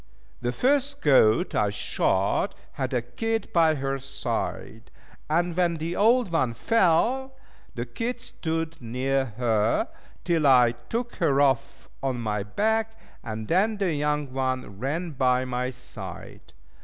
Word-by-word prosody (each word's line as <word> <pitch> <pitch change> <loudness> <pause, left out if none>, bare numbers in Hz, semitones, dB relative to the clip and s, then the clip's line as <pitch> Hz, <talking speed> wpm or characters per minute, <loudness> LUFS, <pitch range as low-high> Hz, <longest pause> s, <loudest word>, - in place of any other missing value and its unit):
The 120 0 0
first 280 - +1
goat 120 -7 +4
I 105 -1 +2
shot 105 - 0 0.2
had - - -3
a 125 -2 0
kid 225 - -3
by 160 -2 +4
her 135 -1 -2
side, 120 -4 -4 0.4
and 170 +2 +1
when 175 -2 +1
the 165 +3 -3
old 230 -1 +3
one 130 -8 +1
fell, 230 - +2 0.4
the 120 -1 -3
kid 230 - -4
stood 165 - -4
near 130 +3 0
her, 115 -3 +1 0.4
till 165 -4 +2
I 125 -3 +6 0.2
took 240 +1 -2
her 145 -5 +2
off 135 -4 +1
on 130 -3 -1
my 105 -3 -1
back, 220 - 0 0.3
and 110 0 -5
then 205 +5 +2
the 190 -5 0
young 150 -2 -1
one 130 -6 -2
ran 160 +7 -2
by 130 -2 +2
my 125 0 -2
side. 110 -8 -9
140 Hz, 140 wpm, -26 LUFS, 125-180 Hz, 0.4 s, I